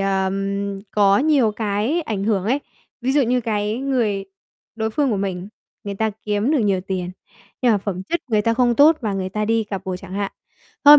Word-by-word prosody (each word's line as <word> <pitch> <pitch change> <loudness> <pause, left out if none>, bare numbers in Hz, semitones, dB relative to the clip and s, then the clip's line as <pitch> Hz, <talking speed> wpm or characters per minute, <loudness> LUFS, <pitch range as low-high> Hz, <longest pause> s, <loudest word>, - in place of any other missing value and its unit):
ờm, 195 +1 -1
có 200 -1 +4
nhiều 275 -7 +3
cái 220 +10 0
ảnh 205 -7 -3
hưởng 205 -4 +1
ấy. 255 +7 +2 0.4
Ví 255 +2 0
dụ 290 - +4
như 250 0 +2
cái 215 0 -1
người 235 -8 0 0.5
đối 220 -1 -1
phương 280 +3 +1
của 215 - +1
mình, 190 -1 -3 0.4
người 200 - -4
ta 220 +2 0
kiếm 210 +4 0
được 300 - +3
nhiều 195 -4 +2
tiền, 185 -1 -3 0.5
nhưng 245 - +5
mà 205 - +3
phẩm 190 -2 -4
chất 340 - -2
người 210 -1 +3
ta 230 +1 +2
không 240 -1 +3
tốt 305 +4 +6
và 215 -5 -1
người 190 -1 -2
ta 210 +2 -2
đi 225 0 +1
cặp 200 -2 -5
bồ 185 -1 -3
chẳng 185 - -11
hạn, 200 -1 -2 0.5
thôi 295 +1 +11
210 Hz, 215 wpm, -21 LUFS, 195-240 Hz, 0.5 s, thôi